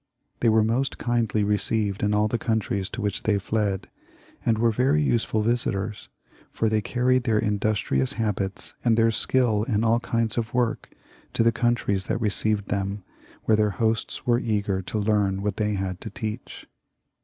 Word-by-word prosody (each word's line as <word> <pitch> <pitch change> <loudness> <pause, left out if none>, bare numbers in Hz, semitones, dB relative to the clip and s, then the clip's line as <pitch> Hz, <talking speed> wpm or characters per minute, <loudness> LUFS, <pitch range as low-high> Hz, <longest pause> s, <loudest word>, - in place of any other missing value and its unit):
They 115 - +3
were 110 0 +4
most 120 +5 0
kindly 115 -3 0
received 105 0 0
in 105 - +1
all 105 0 +3
the 115 +2 -1
countries 105 -4 -1
to - - -5
which 100 -1 -1
they 105 -2 +1
fled, 100 -1 -1 0.6
and 115 -2 +2
were 115 +1 +3
very 130 +7 +2
useful 115 -5 +1
visitors, 105 -3 -1 0.4
for 110 - 0
they 110 0 +1
carried 125 +3 +1
their 110 -3 +2
industrious 105 -11 0
habits 100 -3 -2
and 115 -2 +3
their 115 0 +4
skill 115 -2 +1
in 110 -1 0
all 115 +1 +3
kinds 115 -1 -1
of 115 +1 -4
work 125 -2 0 0.4
to - - +2
the 115 - +4
countries 110 -5 0
that - - -1
received 105 -1 0
them, 100 0 -2 0.4
where 110 - +3
their 105 0 +2
hosts 110 -1 -1
were 120 -1 +3
eager 100 -4 -1
to 95 - -4
learn 100 -2 +1
what 105 -2 -1
they 105 -1 0
had 95 -1 -3
to 110 - -6
teach. 110 +1 -6
110 Hz, 175 wpm, -25 LUFS, 100-115 Hz, 0.6 s, were